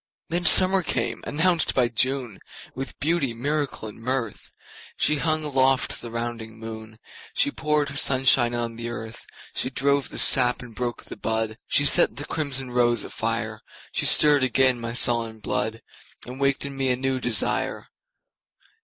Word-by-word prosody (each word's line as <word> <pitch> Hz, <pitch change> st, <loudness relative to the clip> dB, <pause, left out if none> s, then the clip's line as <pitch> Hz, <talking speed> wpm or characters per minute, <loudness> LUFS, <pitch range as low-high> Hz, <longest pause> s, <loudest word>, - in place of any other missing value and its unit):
Then 175 Hz, +1 st, -1 dB
summer 185 Hz, +3 st, +6 dB
came, -, -, -3 dB
announced 165 Hz, +2 st, +1 dB
by 125 Hz, -2 st, +3 dB
June, 125 Hz, -2 st, -1 dB, 0.3 s
With 135 Hz, 0 st, -7 dB
beauty, 150 Hz, -6 st, 0 dB
miracle 140 Hz, -1 st, -2 dB
and 105 Hz, +1 st, -11 dB
mirth. 125 Hz, -3 st, -3 dB, 0.5 s
She 150 Hz, -, +2 dB
hung 155 Hz, +2 st, 0 dB
aloft 135 Hz, -2 st, +1 dB
the 120 Hz, -, -7 dB
rounding 115 Hz, -1 st, -5 dB
moon, 110 Hz, 0 st, -9 dB, 0.4 s
She 285 Hz, -, +2 dB
poured 150 Hz, -, 0 dB
her 140 Hz, -, -7 dB
sunshine 130 Hz, -3 st, +4 dB
on 115 Hz, -1 st, -4 dB
the 115 Hz, 0 st, -5 dB
earth, 115 Hz, -1 st, -8 dB, 0.3 s
She 130 Hz, -, -2 dB
drove 140 Hz, +1 st, 0 dB
the -, -, -8 dB
sap 125 Hz, -2 st, +3 dB
and 120 Hz, -2 st, -12 dB
broke 120 Hz, +1 st, -4 dB
the -, -, -9 dB
bud, 110 Hz, 0 st, -2 dB
She 145 Hz, -, +2 dB
set 120 Hz, -, +5 dB
the 145 Hz, +3 st, -6 dB
crimson 135 Hz, -4 st, -3 dB
rose 120 Hz, -2 st, +2 dB
afire. -, -, -3 dB, 0.3 s
She -, -, 0 dB
stirred 145 Hz, -2 st, +5 dB
again 130 Hz, 0 st, +2 dB
my 115 Hz, 0 st, -4 dB
sullen 115 Hz, -2 st, +2 dB
blood, 110 Hz, +1 st, -3 dB, 0.4 s
And 125 Hz, +2 st, -9 dB
waked 140 Hz, 0 st, +1 dB
in 140 Hz, -1 st, -6 dB
me 135 Hz, -1 st, 0 dB
a 125 Hz, -, +2 dB
new 130 Hz, +1 st, -2 dB
desire. 120 Hz, -6 st, -1 dB
130 Hz, 160 wpm, -24 LUFS, 115-140 Hz, 0.5 s, summer